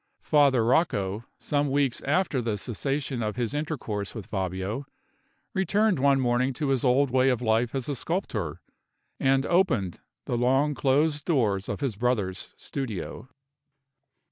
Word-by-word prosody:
Father 140 -6 +4
Rocco, 110 - +1
some 145 -1 0
weeks 135 -2 +1
after 145 -2 +1
the 110 -3 -1
cessation 135 +4 -2
of 105 -1 -2
his 120 +1 -1
intercourse 125 -10 -3
with 110 -4 -6
Fabio, 95 +7 -3 0.7
returned 200 -1 +2
one 140 0 +4
morning 125 +1 +1
to 145 +2 -2
his 135 -3 +1
old 130 +1 +3
way 130 +1 +4
of 125 -3 +1
life 115 +1 +1
as 130 -2 -2
a 145 - -2
sculptor, 115 - -3 0.6
and 135 +1 +3
opened 145 - +1 0.3
the 120 - -1
long 135 +4 +3
closed 145 +2 +1
doors 110 - +1
of - - -3
his 135 -7 -1
brother's 105 -6 -1
studio. 130 -1 -5
130 Hz, 140 wpm, -27 LUFS, 115-145 Hz, 0.7 s, Father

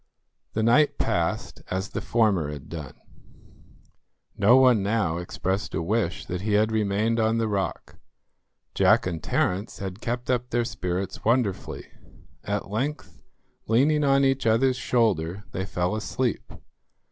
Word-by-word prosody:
The 110 - 0
night 135 +7 +4
passed - - -1
as 95 +2 -2
the - - -4
former 105 -10 +1
had 70 -2 -9
done. 75 -5 -7 1.4
No 120 +6 +5
one 125 -5 +5
now 100 -5 0
expressed 95 +3 -3
a - - -1
wish 100 -1 -1
that 90 -1 -4
he 105 +1 -1
had 110 +2 +3
remained 110 +2 +1
on 110 +1 +2
the 115 -1 0
rock. 100 -2 -3 0.8
Jack - - +4
and 85 -3 -3
Terence 95 +6 -1
had 95 +1 -6
kept 125 +2 -2
up 125 0 -1
their 120 0 0
spirits 95 -5 -4
wonderfully. 115 -4 0 0.6
At 100 -1 -3
length, 110 - -4 0.5
leaning 145 +7 +3
on 140 -1 +4
each 135 -2 +1
other's 125 +4 +3
shoulder, 100 -8 0
they 95 +1 -4
fell 90 +1 -1
asleep. 120 +3 -2
110 Hz, 140 wpm, -25 LUFS, 95-120 Hz, 1.4 s, No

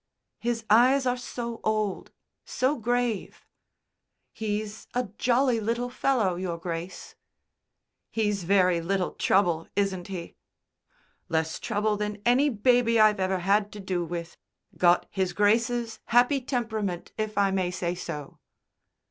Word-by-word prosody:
"His 230 -1 -2
eyes 255 +5 +5
are 250 0 +2
so 235 -1 -6
old, 215 -3 -1 0.3
so 260 +4 0
grave." 240 -3 -2 0.9
"He's 215 0 -4
a 250 -4 -1
jolly 245 0 +2
little 235 +3 -2
fellow, 230 -9 +1
Your 180 -2 -3
Grace." 170 +1 -6 1.0
"He's 210 -4 -1
very 180 -2 +3
little 185 +1 -1
trouble, 175 -4 +1
isn't 195 -3 -1
he?" 180 -4 -7 0.9
"Less 160 0 -1
trouble 210 -1 0
than 210 0 -3
any 255 +5 +4
baby 230 0 +3
I've 215 -1 +5
ever 190 -1 0
had 205 +1 +2
to 210 - -8
do 185 -3 -2
with. 170 0 -6 0.4
Got 175 0 +4
His 190 -2 -1
Grace's 225 +2 +1
happy 245 +4 +3
temperament, 220 -8 -3
if 215 -1 -3
I 200 -1 +3
may 190 -2 0
say 180 -1 -2
so." 150 -5 -7
210 Hz, 130 wpm, -27 LUFS, 185-235 Hz, 1.0 s, eyes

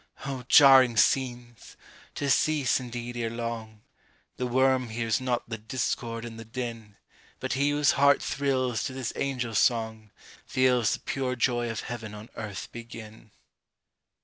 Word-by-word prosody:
Oh, 135 -2 -4
jarring 130 -5 +7
scenes! 120 -1 0 0.4
to 140 -1 0
cease, 145 -3 +2
indeed, 120 -1 -6
ere 115 -1 -2
long; 115 -2 -6 0.5
The 125 - -2
worm 130 0 +2
hears 115 0 -1
not 125 -2 -1
the 115 -1 -5
discord 115 0 -3
and 115 -1 -8
the - - -7
din; 115 -3 -6 0.4
But - - -2
he 140 +2 +2
whose 145 -1 +3
heart 140 +1 +4
thrills 130 -4 -1
to 130 - -4
this 130 -3 -4
angel 125 -4 -2
song, 110 -1 +1 0.4
Feels 125 -3 +2
the - - -5
pure 130 -1 -2
joy 120 -1 0
of 115 - -3
heaven 110 -3 -7
on 105 +2 -10
earth 105 -3 -6
begin! 115 -2 -10
120 Hz, 150 wpm, -27 LUFS, 115-130 Hz, 0.5 s, jarring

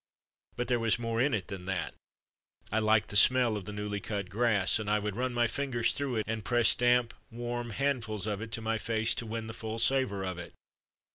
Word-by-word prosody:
But 125 - -3
there 120 -1 +1
was 115 -2 +2
more 115 -1 -1
in 140 +3 +2
it 95 -5 -4
than 95 -2 -7
that. 95 -2 -3 0.8
I 110 - +2
liked 110 0 +2
the - - -7
smell 125 +1 +6
of 100 -3 -5
the 105 - -6
newly 105 0 -4
cut 100 -2 -4
grass, 110 -3 +2
and 105 -1 -4
I 105 - +3
would 105 -1 -3
run 125 +2 -1
my 120 0 +2
fingers 120 -1 0
through 135 -3 -2
it 110 - 0
and 110 -1 -3
press 120 +1 +4
damp, 120 -1 +2 0.2
warm 120 0 -4
handfuls 115 -4 -1
of 105 -1 -3
it 110 0 -7
to 115 - -2
my 110 0 -1
face 110 0 +1
to 115 - -3
win 110 0 -4
the 110 - -7
full 110 0 -5
savour 115 -5 +2
of 90 -2 -4
it. 85 - -9
110 Hz, 225 wpm, -30 LUFS, 105-120 Hz, 0.8 s, smell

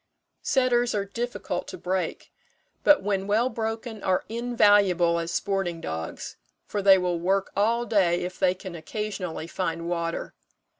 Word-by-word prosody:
Setters 245 -4 +2
are 200 -1 0
difficult 230 -4 -4
to - - -7
break; 185 -2 -3 0.5
but 295 -9 +6
when 195 -1 -1
well 225 +5 +2
broken 225 -1 -4
are 185 -1 +1
invaluable 205 -7 +3
as 165 0 -3
sporting 190 -4 -1
dogs, 80 - -5 0.3
for 205 - -3
they 195 -1 +7
will 180 -2 -1
work 190 +3 0
all 230 +4 +2
day 190 -6 +2
if 180 +1 -6
they 185 -1 +3
can 185 -1 -8
occasionally 180 -1 -4
find 170 -1 -3
water. 170 -1 -3
195 Hz, 145 wpm, -26 LUFS, 175-220 Hz, 0.5 s, they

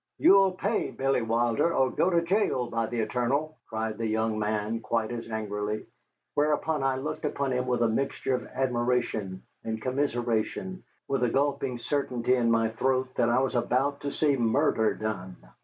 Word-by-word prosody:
"You'll 195 - +6
pay 205 +4 -1
Bill 135 -2 0
Wilder 115 +6 +2
or 130 -1 +3
go 180 - +2
to 170 -2 +2
jail, 170 - +1
by 115 0 0
the 120 0 -2
eternal," 125 +8 -1
cried 110 -1 -3
the 115 - -1
young 110 0 0
man, 105 +1 -1
quite 115 0 -1
as 115 -1 -5
angrily, 105 -1 -3 0.5
whereupon 150 +1 +1
I 135 -1 +1
looked 135 +5 -4
upon 140 -3 -1
him 125 0 -1
with 125 -1 +1
a - - +4
mixture 135 +3 -1
of 125 - -2
admiration 120 -6 -1 0.2
and 110 -1 -3
commiseration, 125 +7 -1 0.2
with 135 -2 0
a 120 - +3
gulping 135 -1 0
certainty 125 -1 0
in 120 -2 +2
my 115 -1 +3
throat 130 +3 0
that 120 - +2
I 120 +2 +3
was 135 - 0
about 130 +3 0
to 140 - -3
see 145 -1 +2
murder 115 -1 +2
done. 95 -4 -4
125 Hz, 175 wpm, -28 LUFS, 110-140 Hz, 0.5 s, You'll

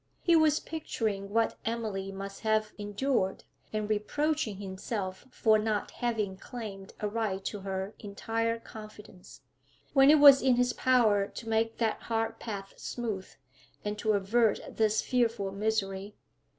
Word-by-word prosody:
He 340 - +5
was 315 -1 +4
picturing 220 -11 -3
what 225 +2 +1
Emily 215 -4 -3
must 195 0 -7
have 215 -1 +1
endured, 205 0 -1 0.3
and 215 -1 -2
reproaching 225 +3 0
himself 190 +1 -5
for 220 -4 +3
not 215 -1 -1
having 215 -5 -2
claimed 200 -4 -8
a 210 - -1
right 205 -3 -2
to 210 - -3
her 190 +1 -4
entire 225 +2 -2
confidence, 215 -4 -12 0.5
when 270 -1 +7
it 305 - +8
was 280 -2 +9
in 260 -1 +4
his 245 0 +2
power 220 -6 +3
to 225 - -9
make 225 0 +1
that 225 -2 0
hard 225 0 -2
path 200 -3 -6
smooth, 215 -6 -4 0.6
and 210 0 -3
to 215 0 +2
avert 210 +3 +2
this 215 -1 +2
fearful 230 -5 0
misery. 200 -1 -2
215 Hz, 140 wpm, -30 LUFS, 200-235 Hz, 0.6 s, was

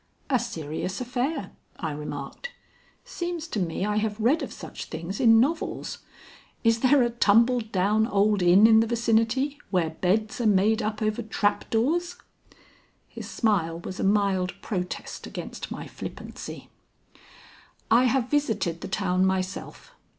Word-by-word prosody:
"A 255 - +4
serious 170 -3 -4
affair," 250 - -2 0.3
I 160 - -3
remarked. 145 - -6 0.6
"Seems 345 -2 -4
to 215 - -2
me 180 +1 -1
I 210 0 0
have 215 0 -1
read 255 +9 +3
of - - -5
such - - -8
things 170 +5 -6
in 225 -3 +6
novels. 310 +7 -1 0.6
Is 230 -1 +3
there 260 +1 +5
a 240 - 0
tumbled 230 +1 +3
down 210 +3 +2
old 205 -2 +2
inn 180 +4 +6
in 220 0 +7
the 225 - +2
vicinity 235 +5 +1
where 175 -4 +1
beds 215 +8 0
are 230 - +2
made 210 +3 +3
up 215 0 -2
over 215 +2 0
trap 210 -2 -1
doors?" 330 +10 0 0.9
His - - -8
smile 170 -8 0
was 185 - -7
a - - -1
mild 195 -2 +1
protest 180 -4 -4
against - - -7
my - - -6
flippancy. - - -8 1.2
"I 240 +3 +6
have 255 -1 +2
visited 225 - 0
the - - -5
town 185 -2 0
myself. 190 - -2
215 Hz, 145 wpm, -26 LUFS, 190-240 Hz, 1.2 s, in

